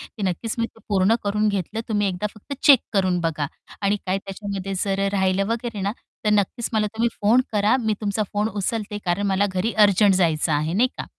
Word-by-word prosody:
ती 210 - -10
नक्कीच 195 +4 -2
मी 230 - +1
ते 225 - -20
पूर्ण 200 +2 +3
करून 210 +1 +1
घेतलं 200 +2 -2
तुम्ही 205 -2 +1
एकदा 185 +3 -2
फक्त 215 +7 -8
चेक 275 -5 +8
करून 185 -3 +1
बघा 155 -3 -1 0.3
आणि 200 +1 +2
काय 185 +1 +1
त्याच्यामध्ये 195 0 -5
जर 195 0 0
राहिलं 190 0 +1
वगैरे 230 -3 -4
ना 200 +2 -1 0.3
तर 210 - +3
नक्कीच 210 +3 0
मला 215 -1 +2
तुम्ही 235 +1 +2
फोन 225 +5 +5
करा 210 +4 +3
मी 220 -2 0
तुमचा 210 0 -1
फोन 210 +1 0
उचलते 210 0 -3
कारण 185 +3 0
मला 195 +1 +2
घरी 185 +5 -1
अर्जंट 200 0 +4
जायचं 165 -3 +2
आहे 155 +3 0
नाही 240 +7 +3
का. - - -3
200 Hz, 205 wpm, -23 LUFS, 190-215 Hz, 0.3 s, चेक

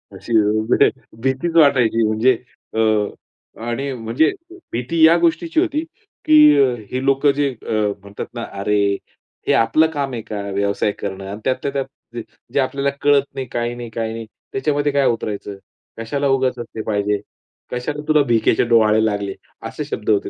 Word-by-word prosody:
अशी 120 - -6
एवढी 110 +5 +3 0.3
भीतीच 135 +6 -1
वाटायची, 125 -8 +4
म्हणजे 110 +4 +3 0.4
अ, - - 0 0.9
आणि 135 +4 -2
म्हणजे 120 +6 +1 0.4
भीती 125 +8 -1
या 165 +2 +6
गोष्टीची 315 - +1
होती 320 -3 0 0.4
की 310 0 +5 0.6
हे 130 +1 -2
लोकं 135 +1 +3
जे 140 0 0
अ, 120 - -9 0.3
म्हणतात 100 +1 -7
ना, 120 -1 -5
"अरे, 100 0 0 0.5
हे - - +4
आपलं 115 +8 +4
काम 140 -4 -3
आहे 115 - -3
का 105 -1 -5
व्यवसाय 100 +1 0
करणं? 95 -1 -5
आणि 100 +2 -6
त्यातल्या 130 +2 -1
त्यात 135 -1 -1 0.3
ज 120 - -3 0.3
जे - - +2
आपल्याला 140 +1 0
कळत 145 -1 +4
नाही, 135 - -3
काही 120 0 -2
नाही, 120 -1 -7
काही 110 0 -3
नाही 115 0 -6 0.3
त्याच्यामध्ये 145 +1 0
काय 140 -1 +2
उतरायचं? 105 -3 -3 0.4
कशाला 140 +5 -2
उगाच 130 -2 +1
असले 115 -2 -6
पाहिजे? 105 -1 0 0.5
कशाला 145 +4 -3
तुला 155 -1 +4
भिकेचे 115 -1 +3
डोहाळे 110 -1 +5
लागले?" 100 -2 -1 0.3
असे - - -5
शब्द 105 - -5
होते 105 -2 +2
120 Hz, 160 wpm, -20 LUFS, 110-140 Hz, 0.9 s, या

